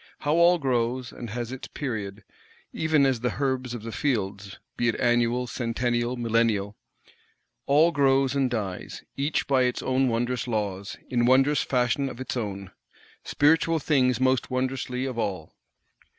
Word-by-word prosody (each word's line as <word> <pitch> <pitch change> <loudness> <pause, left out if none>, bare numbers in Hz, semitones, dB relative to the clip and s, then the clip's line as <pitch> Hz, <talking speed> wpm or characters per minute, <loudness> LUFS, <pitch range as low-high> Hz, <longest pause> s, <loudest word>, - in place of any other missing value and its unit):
How 145 0 +1
all 170 +2 +5
grows, 125 -3 -1
and 120 - -8
has 120 +2 -4
its 130 - -7
period, 105 -7 -5 0.5
even 160 -3 +2
as 130 -3 +1
the 125 +1 -2
herbs 130 -3 -1
of 115 - -8
the 115 - -6
fields, 100 -7 -2 0.2
be 120 - 0
it 115 - +1
annual, 120 0 +2
centennial, 120 +1 -1
millennial! 115 -4 0 0.9
All 155 +5 +5
grows 135 -3 +2
and 135 -2 +2
dies, 100 -6 -5
each 145 +3 -1
by 135 -2 +2
its 125 -1 0
own 130 0 +1
wondrous 120 +2 -1
laws, 100 -4 -3
in 120 -1 +2
wondrous 135 +3 +4
fashion 125 +2 0
of 125 - -10
its 130 +2 -4
own; 100 -5 -4 0.5
spiritual 160 +3 +3
things 130 -5 +2
most 130 -1 +1
wondrously 130 0 -2
of 130 -3 -4
all. 95 -8 -3
125 Hz, 150 wpm, -26 LUFS, 115-135 Hz, 0.9 s, all